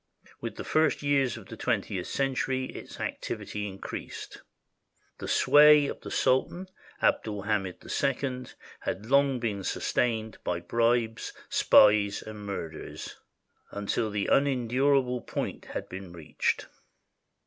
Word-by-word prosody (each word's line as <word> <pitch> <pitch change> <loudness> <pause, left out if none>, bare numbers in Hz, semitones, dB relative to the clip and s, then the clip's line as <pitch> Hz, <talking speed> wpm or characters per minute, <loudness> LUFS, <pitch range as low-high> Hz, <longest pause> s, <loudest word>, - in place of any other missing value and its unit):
With - - -5
the - - -6
first 155 -1 +2
years 140 -4 +2
of 110 - -11
the 115 - -9
twentieth 100 -5 -1
century 130 -1 0
its - - -10
activity 105 0 -4
increased. 95 -1 -7 0.8
The - - -5
sway 150 0 +7
of - - -5
the - - -7
Sultan 175 +8 +1 0.3
Abd - - +3
ul 105 -2 -4
Hamid 95 -3 -2
II 130 -2 -1 0.3
had 100 +4 -4
long 135 +1 +3
been 105 -5 -2
sustained 110 +1 -1
by 90 -1 -1
bribes, 115 +4 0 0.2
spies, 105 -1 +5
and 105 -1 -8
murders, 85 -5 -6 0.5
until 105 +2 -1
the 105 -1 -1
unendurable 130 -1 +2
point - - -4
had - - -5
been 95 -1 -8
reached. 80 -3 -1
115 Hz, 125 wpm, -28 LUFS, 100-135 Hz, 0.8 s, sway